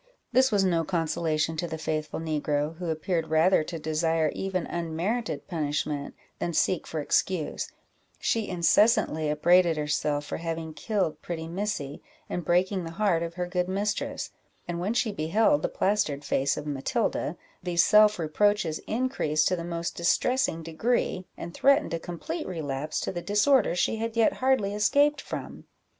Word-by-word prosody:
This 260 +1 +4
was 200 -2 +3
no 170 -3 +2
consolation 160 -2 0
to 175 - -1
the 160 - -5
faithful 155 0 -3
negro, 150 -1 -1
who 175 -1 -4
appeared 160 +1 -1
rather 160 +2 +4
to 165 - -5
desire 160 +1 0
even 190 -3 -2
unmerited 175 +8 -3
punishment 150 -3 -2 0.2
than 170 - -2
seek 175 +2 +1
for 160 - -3
excuse; 160 +2 0 0.5
she 225 -2 0
incessantly 170 -3 +3
upbraided 170 +2 +4
herself 150 -1 -1
for - - -4
having 165 -1 -4
killed 160 -1 -2
pretty 165 -2 -5
Missy, 170 -6 -3 0.3
and 175 - -3
breaking 180 +2 +1
the 165 - -5
heart 185 -3 +1
of 170 0 -4
her 180 0 -2
good 180 0 -1
mistress; 200 +2 -2 0.4
and 170 -1 -3
when 200 +6 -1
she 230 -3 +1
beheld 165 -2 +2
the - - -1
plastered 155 -8 0
face 140 +1 +1
of - - -5
Matilda, 140 -3 -1 0.2
these 175 -1 +2
self 210 0 +6
reproaches 175 +1 +1
increased 215 - +1
to 185 - +1
the 170 - -5
most 170 0 -4
distressing 170 0 +1
degree, 185 +2 -1
and 170 - -7
threatened 275 - +3
a 165 - -1
complete 300 - -5
relapse 155 -4 -3
to - - -2
the 175 -2 -4
disorder 210 +2 +3
she 200 +5 +1
had 230 +1 -3
yet 225 - +4
hardly 255 -6 +1
escaped 285 +8 +3
from. - - -7
170 Hz, 160 wpm, -27 LUFS, 155-205 Hz, 0.5 s, self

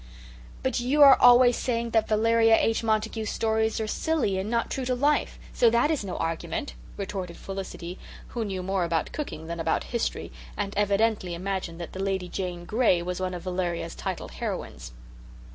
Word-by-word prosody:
"But 260 -1 0
you 275 +5 +4
are 275 -2 +10
always 245 0 +6
saying 235 -2 -2
that 225 -1 +2
Valeria 225 +1 +4
H. 225 +1 +1
Montague's 220 0 0
stories 220 0 0
are 220 - -1
silly 225 -5 0
and 195 +3 -3
not 235 0 0
true 265 - -2
to 255 0 0
life, 290 +4 +1 0.2
so 235 - +5
that 235 +7 +2
is 300 -8 -1
no 185 -3 -5
argument," 165 - -3 0.2
retorted 190 -3 -5
Felicity, 190 -2 -7 0.3
who 235 - -3
knew 190 -3 -4
more 190 0 0
about 165 -2 -1
cooking 275 - -5
than 170 +1 -5
about 165 0 0
history, 235 - -2 0.3
and 200 -1 -2
evidently 205 -2 +1
imagined 185 -2 -4
that 170 - -7
the 190 - -5
Lady 190 -2 -2
Jane 175 -2 -4
Gray 210 -5 +2
was 180 +1 -3
one 185 -1 -2
of 175 - -7
Valeria's 180 - -2
titled - - -5
heroines. - - -5
205 Hz, 180 wpm, -26 LUFS, 180-235 Hz, 0.3 s, are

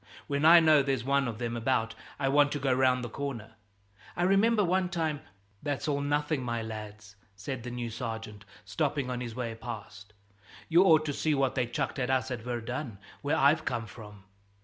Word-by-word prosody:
When 140 +1 -1
I 170 +2 +9
know 155 -3 +5
there's 135 -3 -1
one 140 +1 +1
of 115 -2 -4
them 120 0 -3
about, 115 -1 0 0.2
I 140 - -1
want 145 +1 +4
to 145 - -2
go 135 -1 +1
round 130 -1 +2
the - - -3
corner. 115 -4 -5 0.6
I 175 - 0
remember 205 +4 +4
one 185 0 +1
time 160 -4 -2 0.2
" 100 0 -37
"That's 145 -4 -3
all 140 -1 0
nothing, 145 0 0
my 120 -2 -2
lads," 105 -2 -8 0.2
said 115 +6 -5
the 125 - -6
new 120 -1 -4
sergeant, 110 -3 -6 0.2
stopping 140 -4 -1
on 125 0 -3
his 120 -2 -6
way 120 -2 -3
past, 110 -3 -9 0.5
"you 170 +3 +5
ought 160 -4 +5
to 145 - -2
see 155 +1 0
what 135 -2 +1
they 125 -3 0
chucked 135 +3 -3
us 130 0 0
at 120 -3 -4
Verdun, 120 0 -4 0.2
where 145 - 0
I've 150 +4 +4
come 120 -2 -2
from. 105 -3 -12
130 Hz, 195 wpm, -29 LUFS, 115-145 Hz, 0.6 s, I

